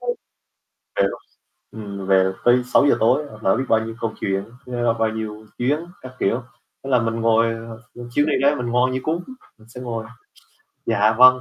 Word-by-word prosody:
Ừ, - - -9 0.9
hiểu. - - +1 0.5
Ừm, 100 -3 -7
về 95 -1 +4
tới 125 +1 +5
6:00 140 +3 +4
tối 130 +7 +3 0.2
lỡ 95 - +3
biết 130 - -1
bao 110 - +4
nhiêu 115 - -6
công 115 -1 -2
chuyện, 95 0 -1 0.2
nhớ 120 -2 0
bao 110 0 +2
nhiêu 110 -1 -6
chuyến, 140 +5 +1 0.2
các 130 0 -9
kiểu. 115 +6 0 0.4
Thế 135 - -5
là 125 -2 +4
mình 115 0 -1
ngồi 115 0 +4
ờ, 115 0 -9
ừm, 120 0 -9
chuyến 145 +4 +2
đi 155 - +1
đó 140 +1 +4
mình 125 - -3
ngoan 125 +2 +2
như 130 - -1
cún, 165 +4 -2 0.3
mình 110 0 -20
sẽ 125 +2 -10
ngồi: 115 -3 -4 0.8
"dạ, 110 -1 +3
vâng" 130 0 +8
115 Hz, 195 wpm, -22 LUFS, 110-125 Hz, 0.9 s, vâng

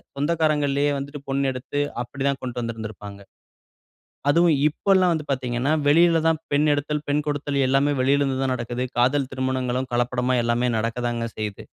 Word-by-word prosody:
சொந்தக்காரங்கள்லயே 145 -2 +1
வந்துட்டு 140 +1 -6
பொண் 140 +1 0
எடுத்து 130 +3 -4 0.2
அப்பிடி 135 +3 -6
தான் 140 -1 0
கொண்டுட்டு 125 -1 -4
வந்திருந்திருப்பாங்க. 110 -3 -7 1.1
அதுவும் 170 +1 +4
இப்பல்லாம் 185 +2 +2
வந்து 155 -2 -3
பார்த்தீங்கன்னா, 130 +1 -1
வெளியில 165 +2 +5
தான் 160 -1 +1
பெண் 145 +2 +3
எடுத்தல், 150 +1 -2
பெண் 145 +1 +1
கொடுத்தல் 145 -1 -2
எல்லாமே 135 +2 +2
வெளில 140 +2 +3
இருந்து 135 -2 0
தான் 130 -1 +1
நடக்குது. 120 +1 -3
காதல் 130 +2 +2
திருமணங்களும் 130 -1 -2
கலப்படமா 125 +1 0
எல்லாமே 120 +1 +1
நடக்க 115 +2 -2
தாங்க 115 -1 -2
செய்யுது. 105 -2 -5
135 Hz, 155 wpm, -23 LUFS, 125-145 Hz, 1.1 s, வெளியில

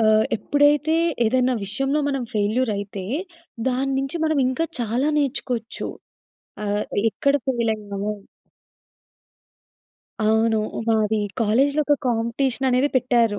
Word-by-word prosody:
ఆహ్, 215 0 +4
ఎప్పుడైతే 290 +5 +3 0.3
ఏదైనా 255 +2 +2
విషయంలో 270 +9 -1
మనం 275 -2 -1
ఫెయిల్యూర్ 215 +3 +1
అయితే 200 -1 -6 0.6
దాన్నుంచి 270 +3 -1
మనం 315 -2 +1
ఇంకా 260 +6 0 0.2
చాలా 240 +5 0
నేర్చుకోవచ్చు. 250 -5 -2 0.8
ఆహ్, 205 0 0 0.3
ఎక్కడ 280 +5 +1 0.2
ఫెయిలయ్యాము? 210 -4 -2 2.1
అవును. 220 0 +3 0.3
మాది 220 -1 +2 0.2
కాలేజ్‌లో 270 +7 +3
ఒక 290 - +5
కాంపిటీషన్ 240 +3 0
అనేది 255 +3 +3
పెట్టారు. 235 -4 +2
240 Hz, 100 wpm, -23 LUFS, 220-270 Hz, 2.1 s, ఒక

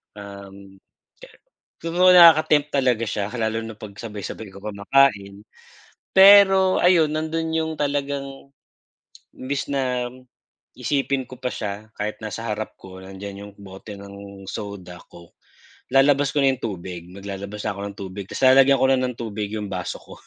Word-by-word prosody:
Uhm. 100 -1 -12 1.0
Siguro 175 +2 +2
nakaka 165 -4 +7
tempt 145 0 -4
talaga 125 -5 +1
siya 105 -2 -3
lalo 110 0 -1
na 115 -1 -8
pagsabay-sabay 105 0 -8
kayo 100 +2 -14
kumakain. 100 -1 +1 0.7
Pero 190 -1 +7
ayun 175 -4 +4
nandun 160 +1 -2
yung 160 0 -1
talagang, 140 -1 -4 0.8
imbis 140 +2 -5
na 125 -3 -1 0.6
isipin 135 -2 -2
ko 130 - -10
pa 130 - -6
siya 110 -2 -5
kahit 105 +1 -4
nasa 110 +1 -6
harap 105 0 -4
ko 95 -1 -13
nandiyan 100 +1 -9
yung 100 - -13
bote 100 +1 -11
ng 100 0 -11
soda, 100 -4 -8
coke. 85 0 -17 0.6
Lalabas 140 +1 +4
ko 145 - +2
na 135 - +4
yung 130 - -15
tubig, 90 -4 -6
maglalabas 100 +2 -7
ako 100 -1 -3
ng 100 - -8
tubig. 95 0 -7
Tapos - - -6
lalagyan 135 +1 +6
ko 130 - +5
na 135 - +3
ng 125 -2 -2
tubig 105 -3 -5
yung 105 -2 -5
baso 90 -2 -4
ko, - - -14
110 Hz, 150 wpm, -22 LUFS, 100-140 Hz, 1.0 s, nakaka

